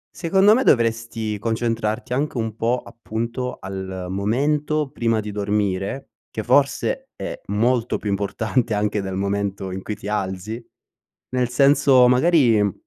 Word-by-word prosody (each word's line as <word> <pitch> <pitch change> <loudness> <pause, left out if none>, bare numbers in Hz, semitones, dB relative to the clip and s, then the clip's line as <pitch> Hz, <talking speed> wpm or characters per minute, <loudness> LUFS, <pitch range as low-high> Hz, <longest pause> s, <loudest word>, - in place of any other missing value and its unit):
secondo 190 +4 +4
me 255 +4 +3
dovresti 115 - +1
concentrarti 115 0 -1
anche 140 +1 -1
un 110 -2 -2
po' 115 +2 +1
appunto 115 +2 -4
al 95 -1 -6
momento 145 +8 0
prima 115 -1 0
di 105 0 -5
dormire, 100 +3 -2 0.2
che - - -5
forse - - +1
è - - -6
molto 115 +3 +1
più 105 - -3
importante 110 +4 -1
anche 105 0 0
dal 95 -1 -4
momento 100 -1 -2
in 95 +1 -5
cui 105 - -4
ti 105 - -9
alzi. 105 +2 -3 0.7
Nel 125 -1 0
senso 135 -1 +5
magari, 125 -4 +4
mhmm 100 -3 +1
115 Hz, 140 wpm, -22 LUFS, 100-125 Hz, 0.7 s, senso